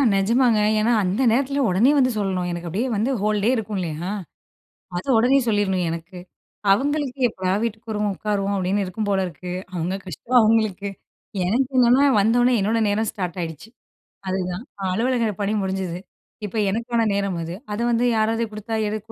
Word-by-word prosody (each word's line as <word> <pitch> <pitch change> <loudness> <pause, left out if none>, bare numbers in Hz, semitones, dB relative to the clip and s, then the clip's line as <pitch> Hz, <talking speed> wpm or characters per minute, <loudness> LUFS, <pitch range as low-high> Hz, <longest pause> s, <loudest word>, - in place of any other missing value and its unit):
நிஜமாங்க. 230 +3 +3 0.2
ஏன்னா 220 +3 +2
அந்த 190 +6 0
நேரத்தில 275 +4 +1
உடனே 205 +10 +4
வந்து 255 -2 +3
சொல்லணும் 185 -3 -1
எனக்கு 175 0 -5
அப்படியே 215 +10 -1
வந்து 220 +6 0
ஹோல்டே 210 +1 +1
இருக்கும் 215 -3 -3
இல்லையா, 170 +1 -3 0.9
அத 175 - -5
உடனே 250 +5 +4
சொல்லிறணும் 195 -4 +1
எனக்கு. 165 +3 -6 0.5
அவங்களுக்கு 280 +4 0
"எப்படா 185 -3 -2
வீட்டுக்கு 225 0 -4
வருவோம் 210 -1 0
உட்காருவோம்" 200 0 -1
அப்படின்னு 195 +2 0
இருக்கும் 205 +3 -4
போல 195 -1 +2
இருக்கு. 180 +1 -8 0.2
அவுங்க 180 +2 -2
கஷ்டம் 230 - -1
அவுங்களுக்கு. 215 -3 +1 0.6
எனக்கு 250 +8 +1
என்னன்னா 250 +3 +5 0.2
வந்த 215 +3 +3
உடனே 245 0 +4
என்னோட 220 +3 +1
நேரம் 215 +1 0
ஸ்டார்ட் 180 -4 -4
ஆயிடுச்சு. 160 +4 -7 0.6
அதுதான். 185 +2 -2 0.2
அ - - -5
அலுவலக 235 0 +1
பணி 200 - 0
முடிஞ்சுது. 190 -2 -3 0.5
இப்ப 210 - -8
எனக்கான 230 +1 0
நேரம் 200 -3 -1
அது. 165 +1 -5 0.2
அத 205 - -3
வந்து 235 +1 +2
யாராவது 225 +1 +1
கொடுத்தா 215 +1 -5
எடு 215 +1 -2
210 Hz, 160 wpm, -22 LUFS, 185-230 Hz, 0.9 s, என்னன்னா